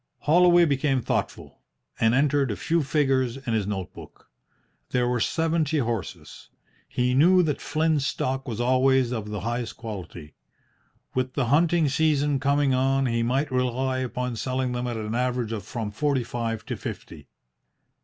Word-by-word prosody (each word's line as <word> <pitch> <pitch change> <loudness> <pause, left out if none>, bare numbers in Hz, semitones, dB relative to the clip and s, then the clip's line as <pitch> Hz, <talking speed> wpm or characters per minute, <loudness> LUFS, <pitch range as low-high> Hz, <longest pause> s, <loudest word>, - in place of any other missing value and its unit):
Holloway 175 +2 +5
became 140 -2 +1
thoughtful, - - -3 0.4
and 115 +2 +3
entered 140 -1 +2
a 105 - -2
few 165 +8 0
figures 135 -4 +1
in 130 -4 -4
his 105 -3 0
note 95 -4 -4
book. - - -14 0.6
There 125 -1 +1
were 125 0 0
seventy 160 +2 0
horses. 110 - -4 0.4
He 125 0 0
knew 180 +7 +5
that 150 -4 -2
Flynn's 155 -2 0
stock 135 +1 -2
was 115 -2 -4
always 130 0 +3
of 110 -3 -4
the 105 -2 -4
highest 120 +2 -3
quality. 90 -9 -8 0.8
With 130 0 -1
the 125 -5 -1
hunting 165 0 +3
season 145 -1 +1
coming 140 0 +2
on 135 +1 +2
he 115 -2 0
might 130 +5 0
rely 130 +1 0
upon 125 -1 -3
selling 130 +1 -2
them 125 0 -3
at 120 -2 -3
an 110 0 -4
average 125 -1 -1
of 110 -4 -4
from 110 -2 -4
forty 135 +3 0
five 115 -2 -4
to - - -4
fifty. - - -8
130 Hz, 160 wpm, -25 LUFS, 115-145 Hz, 0.8 s, Holloway